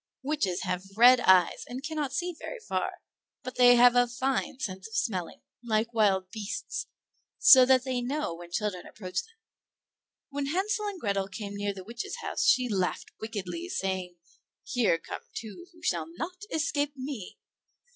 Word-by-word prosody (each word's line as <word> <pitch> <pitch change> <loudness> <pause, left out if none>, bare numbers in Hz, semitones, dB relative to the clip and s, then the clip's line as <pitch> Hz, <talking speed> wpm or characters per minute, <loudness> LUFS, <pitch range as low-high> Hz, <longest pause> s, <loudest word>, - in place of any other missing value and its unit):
Witches 265 -11 -1
have 195 +2 -4
red 250 +2 +8
eyes, 185 -6 +4
and 255 +2 -6
cannot 300 -3 -2
see 355 +4 -2
very - - -6
far; - - -1 0.5
but 255 - -5
they 245 -1 +8
have 245 0 +7
a 245 0 +5
fine 260 +2 -1
sense 190 -6 -5
of 220 - -10
smelling, 190 -6 -2 0.2
like 230 0 0
wild 190 -4 +2
beasts, 205 -2 -4 0.5
so 255 -2 +8
that 260 -1 +5
they 255 -2 -1
know 275 - -2
when 170 +1 -10
children 185 0 -3
approach 185 -4 -4
them. 455 +1 -20 0.9
When 285 0 -3
Hansel 400 +6 0
and 400 -3 -5
Grethel 200 -6 -1
came 200 +1 -6
near 205 0 -2
the 190 - -8
witch's 235 +4 -6
house - - -1
she 255 -1 +4
laughed 190 -5 -1
wickedly, 220 - -5
saying, 190 - -2 0.5
"Here 225 -9 +2
come 165 - -7
two 230 - -8
who 340 -1 -20
shall 165 -3 0
not 360 - -6
escape 290 -2 0
me." 260 -7 -6
235 Hz, 165 wpm, -28 LUFS, 195-275 Hz, 0.9 s, red